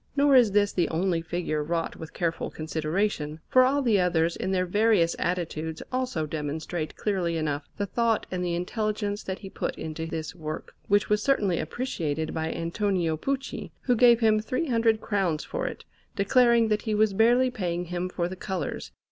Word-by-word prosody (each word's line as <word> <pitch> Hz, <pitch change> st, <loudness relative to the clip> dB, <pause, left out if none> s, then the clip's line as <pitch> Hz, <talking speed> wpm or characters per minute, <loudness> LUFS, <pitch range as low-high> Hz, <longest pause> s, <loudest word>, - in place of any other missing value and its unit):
Nor 285 Hz, -1 st, +5 dB
is 235 Hz, -6 st, +6 dB
this 205 Hz, 0 st, +3 dB
the 175 Hz, -3 st, +1 dB
only 170 Hz, 0 st, 0 dB
figure 165 Hz, -2 st, -2 dB
wrought 165 Hz, +2 st, -2 dB
with 160 Hz, -1 st, -9 dB
careful 165 Hz, -1 st, -2 dB
consideration, 155 Hz, 0 st, -2 dB
for 255 Hz, -, +5 dB
all 275 Hz, +2 st, +2 dB
the 220 Hz, -5 st, +3 dB
others 170 Hz, -2 st, +2 dB
in 190 Hz, -, -3 dB
their 185 Hz, -1 st, +1 dB
various 205 Hz, -2 st, +3 dB
attitudes 160 Hz, -2 st, -2 dB
also 255 Hz, -11 st, -1 dB
demonstrate 155 Hz, +2 st, -4 dB
clearly 180 Hz, -5 st, -1 dB
enough 145 Hz, -2 st, -2 dB
the 205 Hz, -, -1 dB
thought 230 Hz, +2 st, +1 dB
and 180 Hz, -1 st, -2 dB
the 175 Hz, -1 st, -1 dB
intelligence 205 Hz, +2 st, -2 dB
that 190 Hz, 0 st, -4 dB
he 195 Hz, -, -9 dB
put -, -, -3 dB
into 160 Hz, +1 st, -5 dB
this 160 Hz, -1 st, -4 dB
work, 155 Hz, -3 st, -6 dB
which 205 Hz, +1 st, +3 dB
was 210 Hz, 0 st, +2 dB
certainly 205 Hz, -10 st, +2 dB
appreciated 160 Hz, -, -3 dB
by 160 Hz, 0 st, -2 dB
Antonio 170 Hz, -1 st, 0 dB
Pucci, 270 Hz, -, -3 dB
who 245 Hz, -, +2 dB
gave 240 Hz, 0 st, +6 dB
him 215 Hz, -1 st, +4 dB
300 230 Hz, -2 st, +1 dB
crowns 190 Hz, -7 st, 0 dB
for -, -, -3 dB
it, -, -, -7 dB, 0.3 s
declaring 235 Hz, +2 st, +4 dB
that 210 Hz, 0 st, +1 dB
he 220 Hz, -2 st, -1 dB
was 215 Hz, -1 st, +3 dB
barely 240 Hz, +5 st, +4 dB
paying 180 Hz, -6 st, -2 dB
him 180 Hz, +1 st, -3 dB
for 175 Hz, -1 st, -1 dB
the 185 Hz, -, -6 dB
colours. 185 Hz, 0 st, -4 dB
185 Hz, 180 wpm, -27 LUFS, 165-220 Hz, 0.3 s, is